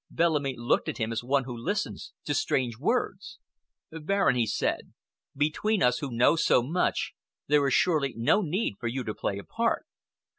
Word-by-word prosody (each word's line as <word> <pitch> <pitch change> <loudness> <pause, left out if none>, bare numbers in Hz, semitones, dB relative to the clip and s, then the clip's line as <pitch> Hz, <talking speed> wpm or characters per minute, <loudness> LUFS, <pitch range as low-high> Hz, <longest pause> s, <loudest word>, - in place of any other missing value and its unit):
Bellamy 150 -5 +1
looked 120 +1 +1
at - - -4
him 115 -1 -2
as 115 0 -3
one 135 +2 +1
who 125 -1 -6
listens 205 - -3
to 145 - -1
strange 125 -4 0
words. 225 - -1 0.5
"Baron," 165 -1 +1
he 120 -2 +1
said, 105 - -2 0.4
"between 175 +8 +1
us 125 0 +3
who 140 - -4
know 120 +7 +4
so 125 -6 +3
much 165 +8 -1 0.3
there 145 -1 +3
is 135 - +2
surely 150 -8 +2
no 120 - +3
need 175 - -2
for 120 - -3
you 130 +2 -2
to 110 - -4
play 100 - -3
a 100 - -7
part. 230 +6 -1
140 Hz, 180 wpm, -28 LUFS, 120-180 Hz, 0.5 s, know